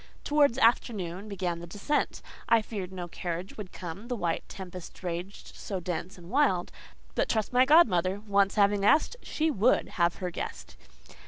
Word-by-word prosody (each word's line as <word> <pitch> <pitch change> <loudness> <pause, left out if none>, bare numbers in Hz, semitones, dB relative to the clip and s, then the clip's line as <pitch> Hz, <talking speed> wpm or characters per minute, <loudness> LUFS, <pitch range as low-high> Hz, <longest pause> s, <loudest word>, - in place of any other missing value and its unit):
Towards 290 -4 +3
afternoon 210 -5 +1
began 180 -4 -2
the 170 - -8
descent. 205 - -1 0.3
I 230 -1 +5
feared 195 -5 -5
no 180 -2 -5
carriage 175 +1 -5
would 205 -4 -8
come, 185 +5 -7
the 245 - -2
white 170 -6 -1
tempest 185 -1 -9
raged 180 +3 -6
so 195 -3 -4
dense 180 +2 -4
and 175 +1 -12
wild. 260 -11 +2 0.4
But - - 0
trust 220 +1 0
my 250 +1 +6
godmother! 200 - +4
Once 200 -2 +2
having 200 -1 +3
asked, 305 - +4
she 315 +1 0
would 245 0 +2
have 170 0 +3
her 180 -2 -4
guest. - - -6
195 Hz, 165 wpm, -29 LUFS, 180-230 Hz, 0.4 s, my